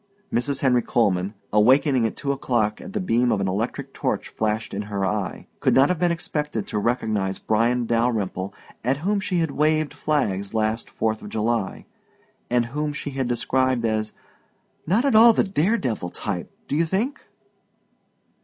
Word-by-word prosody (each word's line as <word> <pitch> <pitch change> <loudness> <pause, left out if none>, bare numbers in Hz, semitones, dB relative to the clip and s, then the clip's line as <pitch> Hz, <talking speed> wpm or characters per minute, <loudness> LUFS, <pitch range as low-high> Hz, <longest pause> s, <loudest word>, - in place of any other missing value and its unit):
Mrs. 135 +3 0
Henry 125 -3 +3
Coleman, 100 -4 +1 0.2
awaking 125 +3 +4
at - - -7
two 140 - -1
o'clock 120 -6 0
at 195 - -9
the 210 - -1
beam 125 - +2
of 105 - +1
an 95 - 0
electric 120 +8 -3
torch - - -2
flashed 110 0 -2
in 100 - -2
her 100 -1 -1
eye, 100 0 -2
could - - +2
not 135 +2 +6
have 180 -3 0
been 175 -1 +2
expected 150 -8 -2
to 105 - -2
recognize 105 -4 0
Bryan 120 +3 +1
Dalyrimple 110 -5 0 0.3
at 130 +3 +1
whom 205 +1 +2
she 190 -2 -1
had 160 -3 0
waved 155 +1 +1
flags 100 -10 -1
last 110 +1 0
Fourth 110 -1 -1
of - - -8
July, 110 -2 -1 0.6
and 120 -1 +2
whom 150 +5 -3
she 145 0 -5
had 135 -2 -2
described 130 0 +1
as 110 -1 0 0.8
"not 215 - +2
at 275 - +3
all 225 +1 +8
the - - +3
daredevil 175 - 0
type, 90 -1 -4 0.2
do - - -1
you 165 +2 +3
think?" 235 - -1
120 Hz, 170 wpm, -24 LUFS, 110-150 Hz, 0.8 s, all